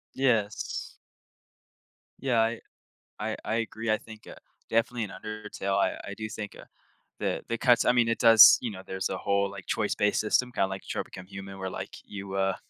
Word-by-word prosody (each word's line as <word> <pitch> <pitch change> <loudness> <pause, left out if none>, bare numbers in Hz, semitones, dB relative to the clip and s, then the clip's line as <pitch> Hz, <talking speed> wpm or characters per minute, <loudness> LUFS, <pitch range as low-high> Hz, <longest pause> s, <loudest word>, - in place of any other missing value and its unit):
Yes. 115 -6 0 1.3
Yeah, 125 -4 +2
I 115 +1 +1 0.6
I - - -3
I - - -1
agree, 115 0 -2
I 110 - +3
think, 110 -1 -13
uh, - - -9 0.4
definitely 115 +1 +1
in 100 - -6
Undertale, 105 -1 -4
I - - +2
I 100 - -6
do 110 +1 -5
think, 105 -1 -7
uh, - - -11 0.5
the - - -2
the 115 - -2
cuts 120 0 +4
I - - +6
mean, 120 -2 +3
it 115 - +1
does, 115 -2 +9
you 120 - -3
know, 95 -2 -8
there's 95 0 -3
a - - -3
whole 100 0 +1
like 100 -2 -10
choice-based 105 -1 +1
system, 125 +3 +1
kinda 95 -5 +1
like, 95 0 -5
Detroit - - -4
Become 90 -1 -11
Human, 95 0 -9
where, 95 - -3
like, - - -6
you, 100 -1 -8
uh, 95 0 +1
110 Hz, 195 wpm, -28 LUFS, 95-115 Hz, 1.3 s, does